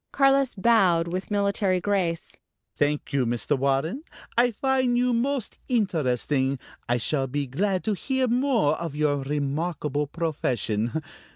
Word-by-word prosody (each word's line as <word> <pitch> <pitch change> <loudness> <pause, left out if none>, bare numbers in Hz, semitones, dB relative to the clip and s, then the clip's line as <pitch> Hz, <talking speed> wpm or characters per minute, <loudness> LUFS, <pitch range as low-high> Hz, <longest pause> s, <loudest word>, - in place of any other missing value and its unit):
Carlos 275 -1 +3
bowed 190 -6 +3
with 185 +2 -4
military 200 -2 +1
grace. 180 -3 -1 0.4
"Thank 145 0 -1
you, 140 -2 +2
Mr. 120 +4 0
Warren. 140 - 0 0.3
I 245 +1 +4
find 255 +1 +1
you 250 0 +2
most 255 0 -1
interesting. 145 - 0 0.3
I 120 - +3
shall 135 +3 0
be 145 +2 -2
glad 185 +8 -1
to 215 - 0
hear 260 +5 -1
more 240 - +2
of 165 -4 -5
your 150 -1 +1
remarkable 145 +1 -2
profession. 130 -5 -2
170 Hz, 130 wpm, -25 LUFS, 140-230 Hz, 0.4 s, I